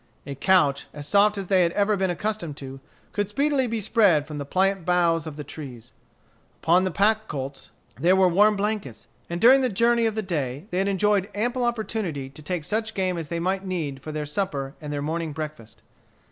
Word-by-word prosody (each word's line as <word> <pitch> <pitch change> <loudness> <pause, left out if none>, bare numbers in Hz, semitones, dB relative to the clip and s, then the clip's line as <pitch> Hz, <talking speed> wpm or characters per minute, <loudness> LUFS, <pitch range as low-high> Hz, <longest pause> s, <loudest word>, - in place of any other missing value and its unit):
A 140 - -5
couch, 145 -2 +2
as 145 -1 -7
soft 205 +5 +4
as 195 - -3
they 185 0 +3
had 170 -1 +2
ever 205 +1 +2
been 190 -1 0
accustomed 175 -4 -3
to, 135 -1 -8 0.3
could 205 -1 -2
speedily 275 +3 +1
be 230 -1 -2
spread 200 -8 +3
from 150 -1 -7
the 140 - -5
pliant 190 +2 +1
boughs 170 -2 +2
of 150 -1 -7
trees. 125 -6 -10 0.7
Upon 180 +3 +4
the - - +1
pack 215 +4 +2
colts 135 -1 -6 0.3
there 180 +3 +4
were 190 -1 +5
warm 205 +4 +4
blankets. 200 - -3 0.2
And 170 0 -3
during 260 +6 +7
the 255 - +1
journey 235 +2 +2
of 220 - -2
the 220 - -1
day 145 -5 -3
they 180 - 0
had 195 - +1
enjoyed 200 0 +1
ample 245 +4 0
opportunity 215 - -2
to 145 - -11
take 160 +1 -4
such 220 +3 -2
game 185 -2 0
as 165 -3 -5
they 170 +1 -3
might 190 +3 -1
need 160 -8 -4
for 155 - -7
their 150 -1 -3
supper 145 -5 -3
and 150 -1 -6
their 145 -1 -3
morning 160 0 -3
breakfast. 150 -7 -8
180 Hz, 205 wpm, -25 LUFS, 150-210 Hz, 0.7 s, during